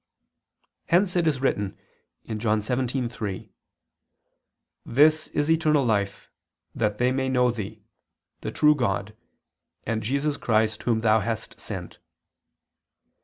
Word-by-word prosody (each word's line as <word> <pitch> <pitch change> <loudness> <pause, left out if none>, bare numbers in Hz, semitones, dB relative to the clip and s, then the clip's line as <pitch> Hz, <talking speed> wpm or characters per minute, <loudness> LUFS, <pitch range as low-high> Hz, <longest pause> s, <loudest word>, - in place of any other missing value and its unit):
Hence 180 +2 +3
it 175 -2 +2
is 140 -4 0
written 100 -7 -1 0.5
(John 110 0 0
17:3): 120 -4 -3 1.3
"This 155 +5 +4
is 150 +2 0
eternal 155 -4 +3
life: 100 -3 -1 0.4
that 105 -1 -1
they 125 +2 +2
may 130 0 0
know 125 -1 +3
Thee, 110 -2 -7 0.6
the... - - -5
true 150 0 +5
God, 105 -6 -2 0.7
and 115 -1 -1
Jesus 140 +6 -1
Christ 110 -1 +1
Whom 115 -2 +1
Thou 110 0 +4
hast 110 +1 -4
sent." - - -7
120 Hz, 115 wpm, -25 LUFS, 110-140 Hz, 1.3 s, true